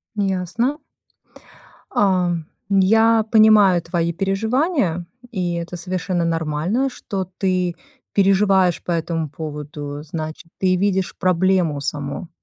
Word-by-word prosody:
Ясно. 200 - -1 1.1
А. 185 -3 +2 0.4
Я 220 +3 +4
понимаю 210 -5 +6
твои 170 0 -1
переживания, 195 - 0 0.3
и 180 -4 -2
это 170 +1 -5
совершенно 180 0 -2
нормально, 165 - 0
что 195 -7 -5
ты 185 -2 0 0.4
переживаешь 195 -2 +3
по 175 - -3
этому 165 -2 -1
поводу. 150 -1 -6
Значит, 155 +1 -6
ты 185 -1 +3
видишь 190 0 0
проблему 185 -5 +2
саму. 145 +3 -4
185 Hz, 100 wpm, -21 LUFS, 165-195 Hz, 1.1 s, понимаю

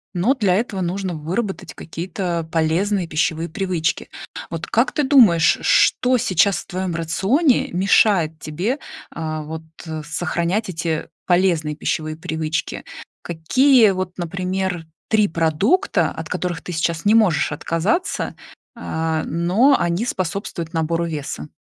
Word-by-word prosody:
Но, 210 +10 +2
для 205 -8 +2
этого, 200 -3 -1
нужно 180 0 -2
выработать 185 +7 -4
какие-то 170 0 -4
полезные 170 +4 +1
пищевые 160 +1 -1
привычки. 175 -2 -2 0.4
Вот - - -4
как - - +2
ты 300 - 0
думаешь, 220 - +5
ш - - -11 0.3
что 255 0 +1
сейчас 195 -4 +2
в - - -11
твоём 185 -2 -3
рационе 195 - +2
мешает 180 -3 +3
тебе, 175 - -2 0.4
э, 155 -1 -3
вот, 160 +1 -7 0.2
э, 155 -1 -4
сохранять 175 +6 -1
эти 165 -2 -2 0.2
полезные 175 -4 +2
пищевые 155 0 -3
привычки? 160 -2 -3 0.4
Какие 220 - +4
вот, 185 -1 -4
например, 180 0 -3 0.2
3 215 -2 +3
продукта, 170 - +1
от 160 0 -7
которых 180 -2 -3
ты 180 - -7
сейчас 165 +2 -1
не 210 - +5
можешь 185 -12 +3
отказаться, 170 - -1 0.4
а, 160 -8 -2
но 190 - +3
они 175 +7 0
способствуют 175 -4 -3
набору 165 +1 0
веса? 150 -3 -5
175 Hz, 130 wpm, -21 LUFS, 160-200 Hz, 0.4 s, думаешь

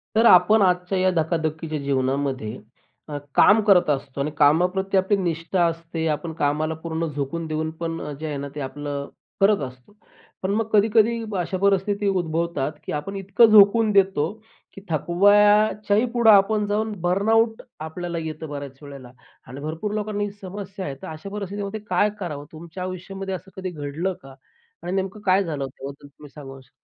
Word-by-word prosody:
तर 225 - +4
आपण 215 +1 +6
आजच्या 180 0 +1
या 185 0 +3
धकाधकीच्या 160 -1 -1
जीवनामध्ये 135 -3 -1 0.5
अ, 145 - -4 0.2
काम 215 +2 +6
करत 195 -6 +4
असतो 140 -1 -2
आणि 150 +2 -2
कामाप्रती 180 +7 +3
आपली 190 +2 +2
निष्ठा 170 0 0
असते. 165 0 -3
आपण 160 +2 -2
कामाला 150 +2 0
पूर्ण 165 0 -2
झोकून 145 +3 -4
देऊन 155 0 -2
पण 165 -1 -3
अ, - - -5
जे 160 - -5
आहे 150 -2 -3
ना, 140 +1 -5
ते - - -5
आपलं 140 +1 -5 0.3
करत 200 +1 +4
असतो. 130 +8 -16 0.5
पण 190 - 0
मग 225 +1 0
कधी-कधी 220 +2 +3 0.2
अशा 180 +1 -2
परिस्थिती 200 +1 +1
उद्भवतात, 170 -5 -1
की - - -5
आपण 150 +7 -4
इतकं 195 +4 +4
झोकून 215 +1 +6
देतो 190 -6 +2 0.4
की 195 - -11
थकवाच्याही 205 - +3
पुढं 235 -2 +4
आपण 205 +1 +4
जाऊन, 215 +2 -1
बर्नआउट 220 +5 +2 0.2
आपल्याला 170 +2 -5
येतं 155 0 -6
बऱ्याच 140 -2 -7
वेळेला 140 -4 -11 0.4
आणि 130 +2 -9
भरपूर 165 +7 -4
लोकांना 210 -1 -2
ही 205 - -3
समस्या 195 0 -7
आहे. 140 - -5
तर - - -8
अशा 160 +5 -8
परिस्थितीमध्ये 200 +1 -5
काय 185 +3 +3
करावं? 150 -6 -5
तुमच्या 170 +3 -8
आयुष्यामध्ये 190 +1 -5
असं 190 +1 -11
कधी 190 -1 -4
घडलं 160 +3 -3
का? 135 -1 -13 0.5
आणि 175 - -4
नेमकं 190 +2 -3
काय 190 +1 +4
झालं 150 -5 -3
त्याबद्दल 140 +2 -10
तुम्ही 145 +1 -15
सांगू 135 -2 -10
शकता? 130 - -24
175 Hz, 170 wpm, -23 LUFS, 150-200 Hz, 0.5 s, आपण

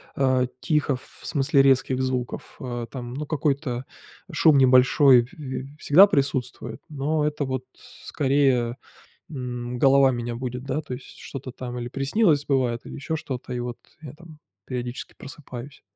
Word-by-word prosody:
а, 130 -2 +2
тихо 150 -3 +1
ф 125 - -5 0.2
в - - -12
смысле 140 -1 +3
резких 135 -1 +3
звуков. 130 -2 -3
Э, 120 -2 -4
там 120 -2 -7
ну 150 +3 -4
какой-то 140 -4 -1 0.5
шум 155 -3 +5
небольшой 130 0 +6
п 125 - -18
п 135 -1 -6
всегда 180 +9 +7
присутствует, 130 - -1
но 150 +1 0
это 150 -1 -1
вот 130 -1 -3 0.4
скорее, 130 -4 +1 0.5
м, 125 -3 -5
голова 135 0 +5
меня 120 -1 -3
будит, 125 0 -5
да, 140 +2 -2
то 130 - -6
есть 125 - -11
что-то 135 -1 -7
там 125 -1 -6
или 120 - -4
приснилось, 145 - +2
бывает, 125 -4 +1
или - - -9
еще 160 +3 -3
что-то, 130 -4 -6
и 125 - -2
вот 120 0 -5 0.2
я 145 -5 -8
там 160 -1 -15 0.3
периодически 125 0 -5
просыпаюсь. 135 -2 -10
130 Hz, 160 wpm, -24 LUFS, 125-145 Hz, 0.5 s, всегда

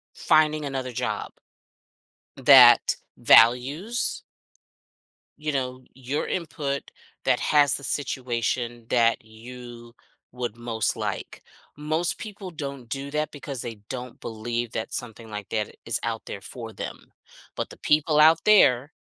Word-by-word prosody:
finding 155 -1 +3
another 130 -2 -4
job - - -3 1.1
that - - +7 0.2
values 140 - +3 1.2
you 150 0 -2
know, 130 -2 -3
your 135 +3 -3
input, 145 -5 -3 0.3
that - - +3
has 145 -2 +4
the 140 - -5
situation 120 -3 -2
that 115 -2 +2
you 120 +1 -11 0.4
would 120 -3 -4
most 115 -2 -2
like. - - -5 0.3
Most 155 +4 -1
people 205 -3 -8
don't 140 -6 -7
do 135 +4 -5
that 150 0 -1
because 140 -3 -7
they 115 -2 -6
don't 125 -1 -7
believe 120 +1 -4
that 110 - -4
something 115 -1 -7
like 105 -1 -6
that 110 -2 -3
is 115 - -1
out 115 -1 -3
there 100 - -6
for 115 0 -9
them. - - -8 0.4
But - - -3
the - - -11
people 150 0 +2
out 160 +1 +7
there 145 -10 +5
125 Hz, 130 wpm, -25 LUFS, 115-150 Hz, 1.2 s, that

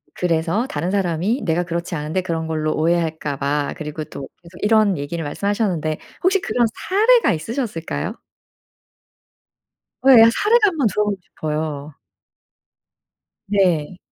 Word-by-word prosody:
그 - - -13
글에서 170 +7 0
다른 160 - -3
사람이 195 - 0
내가 165 0 +1
그렇지 170 0 -4
않은데 155 +3 -2
그런 165 -3 -3
걸로 155 -1 -1
오해할까 160 -3 0
봐." 145 +1 -1
그리고 155 -1 -5
또 135 -1 -8
계속 175 0 -15
이런 210 -3 +3
얘기를 150 +4 -4
말씀하셨는데 175 -2 -1 0.2
혹시 380 +1 +3
그런 240 -6 +1 0.2
사례가 450 +5 +4
있으셨을까요? 165 - -3 1.9
어 265 - +3
예. 230 -3 +9
사례를 450 - +3
한번 315 - +1
들어 210 +1 0
보고 210 -1 -1
싶어요. 155 -3 -4 1.5
네. 185 -4 +1
170 Hz, 300 characters per minute, -20 LUFS, 155-210 Hz, 1.9 s, 예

